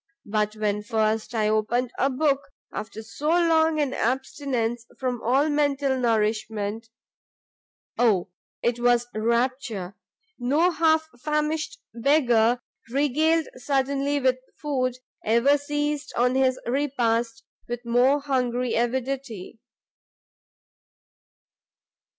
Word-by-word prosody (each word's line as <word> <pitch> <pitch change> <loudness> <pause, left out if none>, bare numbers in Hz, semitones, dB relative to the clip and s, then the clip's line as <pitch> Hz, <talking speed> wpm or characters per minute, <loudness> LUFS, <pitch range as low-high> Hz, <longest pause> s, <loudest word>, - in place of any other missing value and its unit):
But 210 0 -1
when 210 -1 -1
first 220 +2 -1
I 215 -1 +2
opened 225 +3 +1
a 270 - +3
book, 280 +1 +1 0.3
after 220 +1 -6
so 285 +7 -6
long 325 -2 +3
an 285 -3 0
abstinence 250 -2 -1
from 250 -2 -2
all 265 +6 +2
mental 285 -2 +1
nourishment, 220 -2 -1 1.1
Oh 200 -6 +2 0.3
it 240 0 +1
was 240 0 +3
rapture! 235 -3 -1 0.4
no 295 +9 +2
half 315 -1 +2
famished 300 +2 -1 0.2
beggar 240 -2 +3 0.3
regaled 300 +5 +2
suddenly 275 +2 0
with 255 -1 +2 0.2
food, 255 -4 -1 0.3
ever 235 +6 +4
seized 295 0 -2
on 250 +1 +3
his 260 -1 +2
repast 235 -4 0 0.3
with 240 0 -4
more 250 +4 +3
hungry 250 -3 0
avidity." 240 -3 -2
255 Hz, 100 wpm, -25 LUFS, 230-285 Hz, 1.1 s, ever